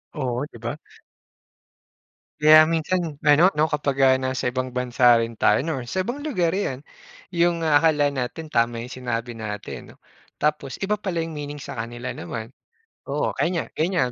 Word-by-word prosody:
Oo, 130 -2 -2
di - - -11
ba? 120 +1 -3 1.7
Kaya 155 +1 +9
minsan 165 +3 0 0.3
ano 150 +5 +7
'no, 155 - +4
kapag, 140 -2 -1
ah, 130 - +6
nasa 130 0 -2
ibang 130 0 -2
bansa 125 0 -3
rin 115 0 -2
tayo 105 -1 +3
or 145 -6 -2
sa 185 - 0
ibang 275 +4 -4
lugar, 180 - 0
ayan. 150 -8 -3 0.5
Yung 170 -1 +2
akala 145 -1 +3
natin, 135 +5 -4
tama 115 0 +2
yung 125 - -8
sinabi 120 -1 -3
natin 105 -2 -6
'no. - - -23 0.4
Tapos 150 -3 -1
iba 205 +2 0
pala 185 -4 -3
yung 165 - -7
meaning 145 0 -6
sa - - -7
kanila 120 +2 -6
naman. 115 +1 -7 0.5
Oo, - - -1
ganiyan, 170 -1 0
ganiyan 160 -7 0
145 Hz, 160 wpm, -23 LUFS, 125-165 Hz, 1.7 s, Kaya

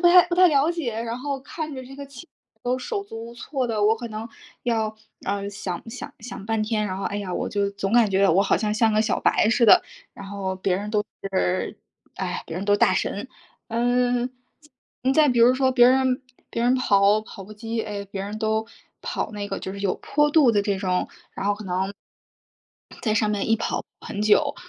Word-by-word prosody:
不 345 - +6
太 355 0 +8
不 345 - 0
太 365 0 +7
了 290 0 +3
解， 255 -10 -3
然 235 +1 -4
后 280 +1 -3
看 310 +2 -6
着 260 -1 -7
这 265 +2 -11
个 280 0 -8
器 275 -3 -11
材 - - -49
都 250 +1 0
手 400 - -3
足 230 - -8
无 235 - -11
措 260 +2 -3
的， 220 -3 -1
我 215 +2 +5
可 235 +1 -6
能 215 0 -5 0.4
要， 220 -3 0 0.3
呃， 200 0 -1
想 200 0 -5
想 250 - -7
想 215 -3 -8
半 225 -1 0
天， 215 -1 0
然 185 -1 -3
后， 195 - -4
哎 205 - -2
呀， 200 -3 -4
我 - - -2
就 200 -1 0
总 200 0 -3
感 230 -4 +5
觉 195 +1 +4
我 185 +4 +4
好 - - +2
像 210 -1 -1
像 220 +1 +3
个 215 - +3
小 220 - 0
白 - - +3
似 230 +1 +3
的， - - +8 0.3
然 200 - -9
后 195 -1 -4
别 185 0 0
人 205 +2 -4
都 210 -1 +1 0.3
是 185 -1 0 0.4
哎， - - -3
别 165 - -6
人 190 - -3
都 205 0 +4
大 - - +4
神。 - - -2 0.4
嗯， 245 +1 +1 0.7
再 260 +1 +3
再 300 +1 +5
比 245 -2 +2
如 240 +2 +6
说 260 0 +2
别 245 -2 +6
人 260 0 +3 0.3
别 230 - -2
人 245 +2 +4
跑 205 -4 +4
跑 200 -2 -10
步 210 - -11
机， 225 +1 -3
哎， 205 -2 -5
别 195 0 -6
人 205 +2 -5
都 220 0 0 0.3
跑 - - -3
那 205 -1 -5
个 195 - -3
就 190 - -6
是 200 - -7
有 195 -2 +1
坡 295 +1 +1
度 290 -6 +5
的 205 - +3
这 200 -1 0
种， 185 -2 0 0.2
然 195 - -4
后 205 - +2
可 210 +1 -10
能 190 +1 -1 1.1
在 215 -3 +1
上 215 -1 +2
面 205 0 -1
一 225 - +5
跑 225 - -2 0.2
很 205 - -6
久。 215 0 +4
220 Hz, 245 characters per minute, -24 LUFS, 200-250 Hz, 1.1 s, 太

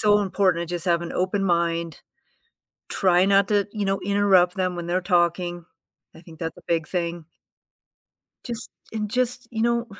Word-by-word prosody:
so 210 -1 +4
important 185 -4 +1
to - - -6
just 175 - -3
have 170 -2 +2
an 170 - -6
open 185 +2 0
mind, 170 -2 0 0.9
try 185 -2 +3
not 195 0 +4
to, 205 -2 +2
you 210 -2 -2
know, 195 0 +1
interrupt 195 -3 +3
them 185 -1 -1
when 175 -1 -5
they're 175 +2 0
talking. 175 -1 0 0.5
I - - -13
think 165 -2 -15
that's 165 0 -4
a - - -15
big 165 -2 0
thing. 170 -2 -3 1.2
Just 235 -3 -6 0.2
and 215 -1 -2
just, 250 0 0
you 225 -1 -2
know, 235 0 +1
185 Hz, 175 wpm, -24 LUFS, 170-205 Hz, 1.2 s, so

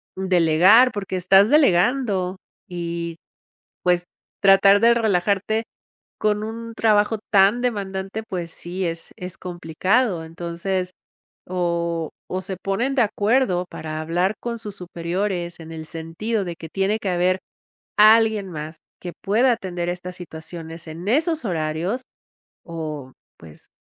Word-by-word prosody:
delegar", 185 +6 +5
porque 195 -2 -3
estás 195 +4 +5
delegando 200 - +3 0.3
y 170 -1 -4 0.7
pues, 180 0 +2 0.3
tratar 195 +1 +6
de 235 +1 +6
relajarte 210 0 +1 0.5
con 210 0 0
un 230 +1 -6
trabajo 215 0 +3
tan 200 +4 +5
demandante, 200 -2 -3
pues 175 -4 -4
sí, 180 +2 -4
es 165 0 -4
es 180 0 -7
complicado. 180 +3 0
Entonces, 175 +3 -3 0.6
o 170 -3 -1 0.2
o 185 +1 -3
se 190 -1 -4
ponen 215 +9 -1
de 245 - +5
acuerdo 210 -3 +1
para 155 0 -5
hablar 175 +6 0
con 235 -1 -4
sus 210 -3 -7
superiores 175 0 -3
en 165 0 -10
el 160 -1 -7
sentido 165 +7 -3
de 175 - -5
que 160 - -9
tiene 195 +5 0
que 200 - -3
haber 180 +1 +2 0.6
alguien 215 -2 +5
más 155 0 -6 0.2
que 175 -1 -6
pueda 235 +6 +3
atender 180 -6 -3
estas 180 0 -6
situaciones 165 -1 -8
en 165 +4 -8
esos 315 +3 +1
horarios, 170 +7 -2 0.6
o 155 -5 -6 0.2
pues, 80 -2 -13
185 Hz, 130 wpm, -22 LUFS, 170-210 Hz, 0.7 s, tratar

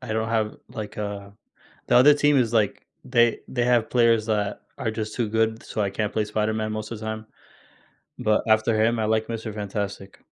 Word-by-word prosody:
I 125 -4 -5
don't 110 0 -1
have 110 -2 0
like, 110 -4 -7
uh 100 -1 -5 0.6
the 120 - +4
other 145 +4 +8
team 145 0 +3
is, 120 -4 +2
like 110 -3 0 0.2
they 120 -2 +3
they 120 -2 -1
have 120 -2 +2
players 115 -3 +3
that 105 -2 -1 0.2
are 115 - -1
just 110 -1 -4
too 115 -4 -1
good, 110 +1 0
so 110 - -5
I 100 - +1
can't 105 +1 -2
play 110 - 0
Spider 105 +1 -1
Man 110 0 -2
most 110 0 -5
the 115 - -5
time. 110 0 -5 0.9
But 105 0 +2
after 110 0 +3
him, 115 +1 +2
I 110 - 0
like 110 +1 0
Mister 115 -1 -4
Fantastic. 100 -1 -5
110 Hz, 205 wpm, -24 LUFS, 105-115 Hz, 0.9 s, other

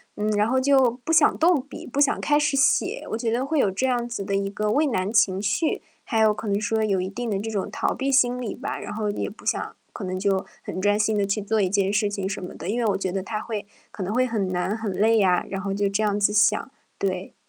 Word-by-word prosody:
嗯， 210 +1 -1
然 210 +1 +2
后 260 +2 +2
就 265 -2 +4
不 - - -2
想 325 - +5
动 330 -3 +4
笔、 275 +1 -10
不 275 +3 -4
想 285 -1 +3
开 295 0 +3
始 295 -2 +1
写， 270 - +2
我 220 - -1
觉 230 -1 -1
得 245 +4 0
会 310 0 0
有 200 - +3
这 200 +8 -1
样 240 -2 0
子 235 -4 -4
的 195 0 -2
一 195 0 0
个 210 +1 -1
畏 300 +6 +3
难 200 -5 -1
情 195 -4 +3
绪， 210 +10 0 0.2
还 225 -3 0
有 215 -1 +5
可 215 +1 -7
能 200 0 +1
说 220 +1 0
有 195 -3 +1
一 185 - -3
定 235 +2 -4
的 200 - 0
这 225 +2 -4
种 200 -3 -2
逃 - - -1
避 275 0 -2
心 250 -2 +3
理 225 - -4
吧。 - - -5
然 - - -6
后 215 -2 -1
也 205 - -3
不 210 - -15
想， - - -1 0.2
可 200 - -6
能 185 0 -3
就 195 0 0 0.2
很 185 - -5
专 205 +1 +3
心 215 0 +1
地 200 -1 +1
去 205 +1 -1
做 215 +2 0
一 185 - +1
件 195 0 +1
事 210 0 +1
情 195 -2 -3
什 195 -1 -4
么 180 - -7
的， - - -6
因 235 +3 -1
为 235 - 0
我 205 - +2
觉 190 -2 -2
得 195 +1 -2
它 215 +2 -4
会 210 -3 -5 0.2
可 200 - -8
能 190 +4 -2
会 255 - +3
很 220 -6 -1
难、 180 +3 -1
很 225 -2 -4
累 220 +4 +3
呀， 185 -3 +3
然 195 0 -4
后 195 0 -2
就 200 0 0
这 200 +2 -1
样 205 -1 +1
子 205 0 +2
想， 210 +5 +3 0.3
对。 190 -1 -3
210 Hz, 300 characters per minute, -24 LUFS, 195-235 Hz, 0.3 s, 想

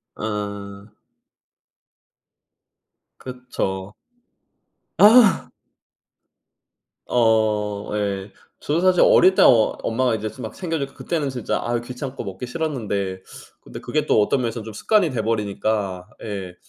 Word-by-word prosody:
어. 100 -1 -5 2.3
그쵸. 105 -6 -5 1.0
아. 220 0 +6 1.6
어 110 -3 +1
예. 100 -1 -3 0.3
저도 155 +4 0
사실 185 -1 +3
어릴 190 +1 +6
때 - - +4
어 - - +8 0.4
엄마가 125 +1 0
이제 110 0 -3
막 - - -6
챙겨주고 160 -6 -4
그때는 155 -5 -2
진짜 125 -3 -2
아 120 0 0
귀찮고 125 +1 -7
먹기 95 +5 -6
싫었는데, 105 - -3 0.4
근데 - - -10
그게 - - -2
또 - - +3
어떤 130 +5 +1
면에서는 115 -1 -3
좀 110 - -8
습관이 200 - +2
돼 115 -4 -2
버리니까. 105 -3 -2
예 95 -4 -6
110 Hz, 215 characters per minute, -22 LUFS, 100-135 Hz, 2.3 s, 어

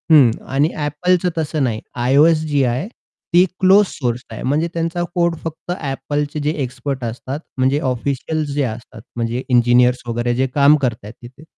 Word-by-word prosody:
हं. 130 -6 +7 0.2
आणि 145 +3 +3 0.2
Appleचं 180 +4 +1
तसं 155 -2 -1
नाही. 115 -4 -1 0.3
iOS 155 +4 +4
जी 145 -2 +2
आहे, 125 +8 -1 0.5
ती 175 +2 +6
क्लोज 195 +2 +6
सोर्स 125 -6 -3
आहे. 110 - -7
म्हणजे 150 +5 +1
त्यांचा 170 +1 -2
कोड 170 -1 +2
फक्त 165 +2 -6
Appleचे 145 -1 -3
जे 150 - +1
एक्सपर्ट 130 +1 -4
असतात, 130 +5 -5 0.2
म्हणजे 130 +2 +2
ऑफिशियल्स 140 +4 -2
जे 145 - +1
असतात, 110 -1 -6
म्हणजे 120 +2 -2
इंजिनिअर्स 125 0 +4
वगैरे 120 +1 -1
जे 130 +1 +1
काम 145 +1 +6
करत 120 -3 +1
आहेत 105 +2 -9
तिथे, 125 +5 -13
140 Hz, 165 wpm, -19 LUFS, 125-155 Hz, 0.5 s, हं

